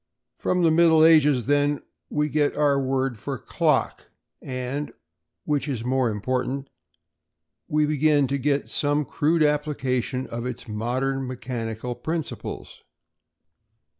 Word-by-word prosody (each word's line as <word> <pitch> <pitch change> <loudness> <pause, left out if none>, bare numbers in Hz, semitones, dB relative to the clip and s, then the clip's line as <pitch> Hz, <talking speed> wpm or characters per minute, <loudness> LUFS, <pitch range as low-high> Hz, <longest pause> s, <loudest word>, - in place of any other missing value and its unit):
From 180 -1 +1
the 165 - +5
Middle 160 -1 +6
Ages, 150 -7 +5
then, 145 +1 +1 0.3
we 150 0 0
get 150 -1 +1
our 145 -2 +2
word 130 -3 -1
for - - -4
clock - - 0 0.3
and, 130 +3 -4 0.5
which 150 -1 0
is 125 -6 -3
more 130 -1 +1
important, 130 +5 -2 1.0
we 150 0 +2
begin 150 -1 +3
to 140 +2 -1
get 140 +1 0
some 145 0 0
crude 155 +5 +1
application 135 -4 0
of 120 0 -5
its 125 -1 -6
modern 130 +5 -2
mechanical 120 -2 -4
principles. 155 +6 -5
140 Hz, 120 wpm, -24 LUFS, 125-150 Hz, 1.0 s, Middle